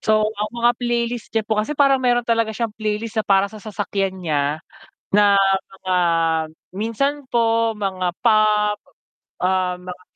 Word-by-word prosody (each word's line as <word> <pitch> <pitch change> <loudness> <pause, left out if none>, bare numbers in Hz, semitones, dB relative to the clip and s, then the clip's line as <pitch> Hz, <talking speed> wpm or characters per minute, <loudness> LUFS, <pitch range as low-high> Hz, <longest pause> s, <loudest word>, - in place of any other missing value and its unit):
so 215 0 +2
ang 215 0 -3
mga 240 0 +3
playlist 240 -1 -1
niya 220 - +2
po 215 0 -1
kasi 255 +8 -3
parang 275 -2 +4
mayro'n 245 -1 +2
talaga 230 -1 +1
siyang 230 0 -2
playlist 215 +1 -3
na - - -6
para 195 0 +4
sa 215 - -9
sasakyan 200 -2 -3
niya 150 -2 0 0.5
na 205 0 +5 0.5
mga 185 -1 -1 0.8
minsan 230 +7 0 0.2
po 230 -1 +2
mga 190 -4 -2
pop, 210 -2 +3 0.6
ah, 185 0 +1
mga 180 0 -9
215 Hz, 150 wpm, -21 LUFS, 195-230 Hz, 0.8 s, na